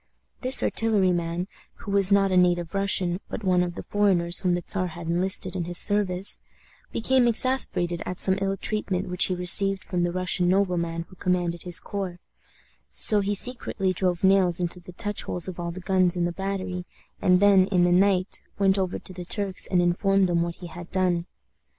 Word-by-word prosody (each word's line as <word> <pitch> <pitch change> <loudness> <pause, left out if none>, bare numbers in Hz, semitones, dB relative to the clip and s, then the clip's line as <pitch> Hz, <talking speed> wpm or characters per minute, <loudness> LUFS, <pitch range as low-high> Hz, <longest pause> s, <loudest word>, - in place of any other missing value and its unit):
This 255 +1 +3
artilleryman, 180 -5 0 0.3
who 205 - -9
was 200 -1 +5
not 195 -1 +3
a - - +1
native 175 -1 +1
Russian, 190 -2 0
but 220 - -6
one 180 -2 +2
of 175 -1 -3
the - - -7
foreigners 180 -4 +1
whom 180 -2 0
the 175 - -4
Czar 185 -2 -2
had 170 0 -9
enlisted 185 +2 -1
in 175 -2 -3
his 175 0 +1
service, 195 -2 +4 0.5
became 255 +1 +1
exasperated 215 -8 0
at 180 - -6
some 190 - +1
ill 195 0 -1
treatment 195 -4 -3
which 180 +1 +1
he 185 - -2
received 190 +2 +2
from 180 -2 -3
the 175 0 0
Russian 180 0 -1
nobleman 175 -3 -1
who 185 - -17
commanded 175 -2 -2
his 180 -1 -1
corps; 190 -3 -6 0.7
so 210 - +7
he 205 +1 -1
secretly 200 -4 -1
drove 180 0 -2
nails 190 -2 +3
into 180 0 -3
the 180 +1 -13
touchholes 190 -3 -2
of 185 -2 -7
all 170 0 -4
the 170 +2 -7
guns 185 -1 +1
in 175 -1 -1
the 175 - -2
battery, 185 -1 -5 0.3
and 180 -1 +3
then, 195 -2 +4
in 180 -3 +1
the 175 - +2
night, 185 +1 +1 0.2
went 195 -1 +2
over 185 -1 -2
to 185 - -10
the 180 -1 -8
Turks 195 +1 -3
and 180 -2 +1
informed 195 +2 +1
them 175 -2 0
what 170 0 -3
he 180 - -11
had 175 +1 -10
done. 180 -2 0
185 Hz, 195 wpm, -24 LUFS, 175-195 Hz, 0.7 s, so